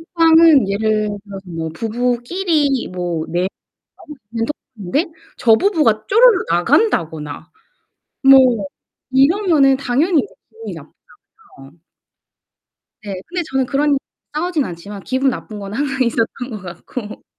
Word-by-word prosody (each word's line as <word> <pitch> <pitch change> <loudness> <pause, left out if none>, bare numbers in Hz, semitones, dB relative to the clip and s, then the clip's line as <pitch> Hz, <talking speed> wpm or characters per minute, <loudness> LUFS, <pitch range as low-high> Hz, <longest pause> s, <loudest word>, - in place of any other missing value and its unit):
톡방은 325 - +6
예를 215 +1 0 0.2
들어서 195 -1 -8
뭐 165 -1 -4
부부끼리 250 - -1
뭐 175 -3 -3
내 180 +2 -1 0.5
나올 - - -17
수 220 - -44
있는 230 -1 -1 0.3
톡인데 210 - -1 0.3
저 225 -2 +5
부부가 275 - +1
쪼르르 450 -2 +5
나간다거나 170 - 0 0.8
뭐 255 -7 +6 0.5
이러면은 285 -1 +4
당연히 285 +6 +1 0.3
기분이 450 0 -9 0.7
나쁘잖아요. 155 - -18 1.2
네 200 -2 -5
근데 360 0 -3
저는 265 -1 +1
그런 280 +4 0
일로 280 - +3 0.4
싸우진 320 -1 -1
않지만 195 +4 -8
기분 265 +1 +1
나쁜 215 -4 -6
건 200 0 -7
항상 275 0 -1
있었던 235 +2 -2
것 210 -3 -6
같고 205 +5 -8
245 Hz, 275 characters per minute, -18 LUFS, 200-300 Hz, 1.2 s, 톡방은